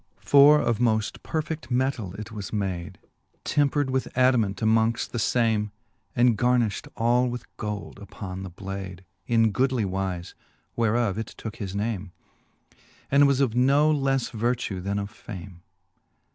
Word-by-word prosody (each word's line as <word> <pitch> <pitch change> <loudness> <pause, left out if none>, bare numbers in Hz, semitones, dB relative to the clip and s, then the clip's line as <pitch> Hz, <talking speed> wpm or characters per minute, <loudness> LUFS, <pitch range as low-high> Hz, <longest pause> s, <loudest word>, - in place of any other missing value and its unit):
X. - - -16
For 145 +1 +8
of 120 -6 0
moft 110 -3 +1
perfed 160 -1 -4
metall 125 -7 -1
it 110 +1 -7
was 105 -3 -6
made,. 95 -5 -3 0.5
Tempred 145 -1 +1
with 130 0 0
adamant 125 -6 +3
amongft 110 +1 +2
the 120 - -3
fame. 110 -2 +1 0.4
And 120 -1 +4
garniflit 120 -1 +1
all 120 +2 +3
with 120 0 -5
gold 105 -2 -5
upon 95 -2 -7
the 95 - -6
blade 95 0 -7 0.2
Jn 115 -2 +3
goodly 130 0 +1
wife, 95 -2 -3 0.4
whereof 115 -2 +1
it 110 - -6
tooke 110 -2 -7
his 100 -2 -5
name, 100 -3 -3 1.0
And 140 +1 +6
was 140 -1 +2
of 130 -5 +2
no 140 +5 +4
lelTe 135 -3 0
vertue, 115 -4 -1
then 100 +2 -2
of 100 0 -4
fame. 95 -6 -10
115 Hz, 145 wpm, -26 LUFS, 100-125 Hz, 1.0 s, For